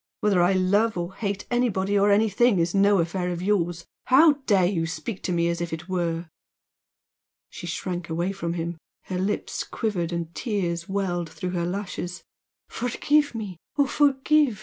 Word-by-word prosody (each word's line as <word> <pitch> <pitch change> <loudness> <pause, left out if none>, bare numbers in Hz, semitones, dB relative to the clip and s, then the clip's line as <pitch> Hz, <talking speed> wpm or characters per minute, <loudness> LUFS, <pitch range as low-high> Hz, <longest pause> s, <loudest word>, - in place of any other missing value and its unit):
Whether 200 -4 +3
I 175 +2 +4
love 200 +3 +2
or 175 +2 -3
hate 200 -1 -3
anybody 205 -5 +1
or 200 +1 +4
anything 215 +2 +4
is 170 0 +1
no 200 0 +4
affair 180 +1 -1
of 175 -1 -3
yours! 175 -4 0 0.2
How 300 +5 +7 0.2
dare 195 -4 +4
you 170 -3 0
speak 195 +5 -5
to - - -2
me 170 -1 +2
as 170 0 -1
if 170 -2 -3
it 160 +2 -6
were!" 170 -2 -2 1.2
She 175 - -8
shrank 175 0 -4
away 170 +4 -1
from 170 -4 -3
him. 170 -1 -4 0.2
Her 185 -1 -4
lips 200 +3 -2
quivered, 185 -7 -2
and 170 -1 -4
tears 175 -7 -2
welled 180 -4 -1
through 180 - -5
her 175 -2 -1
lashes. 180 -1 -4 0.4
"Forgive 285 +4 +1
me!... 205 -6 -5 0.2
oh, 285 - +5
forgive!" 280 -3 +3
185 Hz, 170 wpm, -25 LUFS, 175-210 Hz, 1.2 s, How